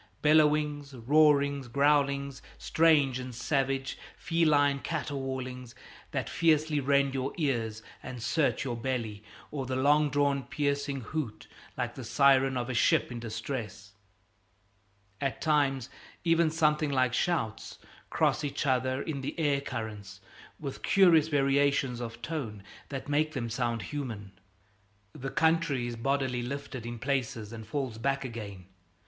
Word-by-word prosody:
Bellowings, 150 -2 +3
roarings, 140 +1 +3
growlings, 140 0 +1 0.2
strange 150 -6 +3
and 125 -1 -7
savage; 135 +1 -1 0.2
feline 150 -4 +2
caterwaulings 130 -5 -4 0.3
that - - -3
fiercely 155 -2 +2
rend 140 0 +2
your 135 0 -2
ears 115 -8 -1 0.2
and 130 -1 -7
search 145 +6 +1
your 120 -3 -2
belly, 115 -4 -3 0.3
or 135 -4 -4
the 130 - -2
long 145 +3 +4
drawn 140 0 +1
piercing 140 +1 -2
hoot 125 -2 -4 0.3
like - - -2
the - - -8
siren 135 -1 +4
of 120 -1 -2
a 130 - -3
ship 120 - +3
in 120 - -5
distress. 110 -3 -6 1.3
At 135 -2 -1
times, 140 -5 +1 0.4
even, 165 -1 +3
something 155 -1 +2
like 130 -3 +2
shouts 125 -10 -1 0.3
cross - - +1
each 145 +1 -2
other 130 0 +1
in 145 -4 -4
the 135 - -5
air 145 -3 +2
currents, 110 -7 -6 0.4
with 140 -3 -6
curious 170 -5 +5
variation 140 -3 +2
of 115 0 -7
tone 115 -9 -4 0.3
that 135 -2 -5
make 155 +2 +1
the 120 -5 -3
sound 115 -2 -1
human. 110 -6 -5 0.8
The 135 +1 -5
country 160 -6 +2
is 120 -1 -4
bodily 130 0 0
lifted 130 -1 -5
in 120 0 -5
places 125 -4 -2
and 110 -2 -8
falls 130 -3 -3
back 135 +2 0
again. 105 -6 -7
135 Hz, 135 wpm, -29 LUFS, 120-145 Hz, 1.3 s, curious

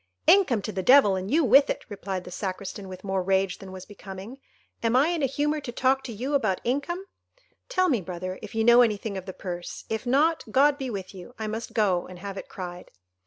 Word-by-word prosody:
"Income 290 - +5
to 215 - -3
the 190 - -3
devil, 230 -3 +6
and 190 +1 -4
you 315 +4 +3
with 270 +3 +6
it," - - -3
replied 195 -3 -5
the 180 - -10
Sacristan, 190 +1 -5
with 185 0 -9
more 190 -1 -1
rage 190 0 +1
than 190 -1 -10
was 185 0 -9
becoming; 205 +4 -10 0.4
"am 230 +1 +1
I 275 +5 +4
in 345 -2 -1
a 275 - +3
humour 295 +3 -1
to 250 - -6
talk 265 +2 +1
to 240 - -5
you 250 +7 -4
about 215 -10 +1
income? 285 +9 -2 0.6
Tell 370 -7 +2
me, 250 - +1
brother, 185 +1 -5
if 215 0 -9
you 225 - +2
know 240 +1 +7
anything 215 -3 0
of 190 0 -6
the - - -4
purse; 175 -2 -6
if 220 +2 -3
not, 310 +6 +3
God 280 +5 +4
be 265 -2 -3
with 195 -4 -6
you—I 215 +5 -8
must 220 +2 -5
go 190 -5 +1
and 185 - -10
have 195 +2 -7
it 195 - -8
cried." 180 -1 -7
215 Hz, 225 wpm, -26 LUFS, 190-270 Hz, 0.6 s, know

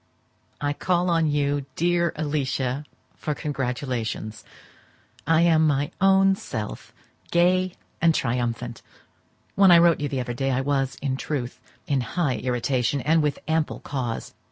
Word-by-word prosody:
I 145 0 -1
call 180 +2 0
on 165 -1 +2
you, 145 -1 0
dear 170 0 +2
Alicia, 140 -2 -2 0.3
for 150 - -3
congratulations: 125 -6 -3 0.8
I 165 +1 +4
am 160 -2 +4
my 145 -1 0
own 195 0 +5
self, 110 - -6 0.4
gay 180 +1 +2 0.3
and 165 -1 +4
triumphant! 120 -1 -2 0.7
When 195 -1 +5
I 175 - +9
wrote 170 -1 +5
to - - -7
you 145 - -1
the 135 - -2
other 120 0 -4
day 135 +3 -1
I 130 0 +1
was, 135 -1 -1
in 135 -2 -1
truth, 135 -4 -4 0.3
in 140 -2 +1
high 135 +2 -1
irritation, 125 +2 0
and 160 +4 +3
with 150 -1 0
ample 160 -1 0
cause. 125 -5 -4
145 Hz, 145 wpm, -24 LUFS, 130-165 Hz, 0.8 s, I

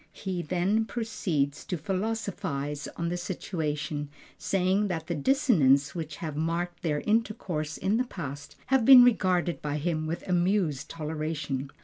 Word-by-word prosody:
He 185 -3 -3
then 185 +6 +1
proceeds 195 -12 -2
to 180 - -2
philosophize 175 -7 -3
on 170 0 -1
the 175 - -2
situation, 155 -5 -3 0.3
saying 195 +2 +1
that 165 -4 -3
the 170 - -2
dissonances 150 - +3
which 160 -4 -5
have 155 -1 -5
marked 170 +3 -2
their 150 -3 0
intercourse 195 -8 -1
in 205 +4 +1
the 255 - +1
past 145 - -7 0.2
have 265 -3 +5
been 255 +1 +10
regarded 185 -7 +2
by 150 0 -2
him 155 0 -1
with 165 +2 -4
amused 180 -5 +1
toleration. 150 -3 -3
170 Hz, 140 wpm, -28 LUFS, 150-195 Hz, 0.3 s, been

